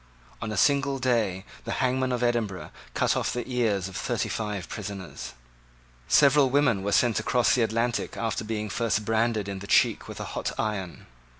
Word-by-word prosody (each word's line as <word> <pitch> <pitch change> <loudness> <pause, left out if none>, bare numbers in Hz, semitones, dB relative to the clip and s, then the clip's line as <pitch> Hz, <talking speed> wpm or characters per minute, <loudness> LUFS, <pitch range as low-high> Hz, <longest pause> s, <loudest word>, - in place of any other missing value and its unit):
On 110 -2 -3
a 105 - -3
single 140 +2 +3
day 110 -7 0 0.2
the - - -3
hangman 130 0 0
of 125 -1 -1
Edinburgh 115 -6 -1 0.2
cut - - +2
off - - 0
the 120 0 -4
ears 110 -7 0
of 95 - -10
thirty - - -1
five 105 -4 -3
prisoners. 100 -4 -7 0.7
Several 140 -1 +5
women 125 -7 +3
were 100 +1 -2
sent 120 +1 +3
across 125 -1 +2
the 125 - +2
Atlantic 115 +2 0
after 115 0 -2
being 110 -1 -3
first 105 -1 -1
branded 110 -1 +1
in 100 -1 -4
the 100 - -9
cheek - - +3
with - - -8
a - - -4
hot - - -2
iron. 100 -5 -3
115 Hz, 180 wpm, -27 LUFS, 100-125 Hz, 0.7 s, Several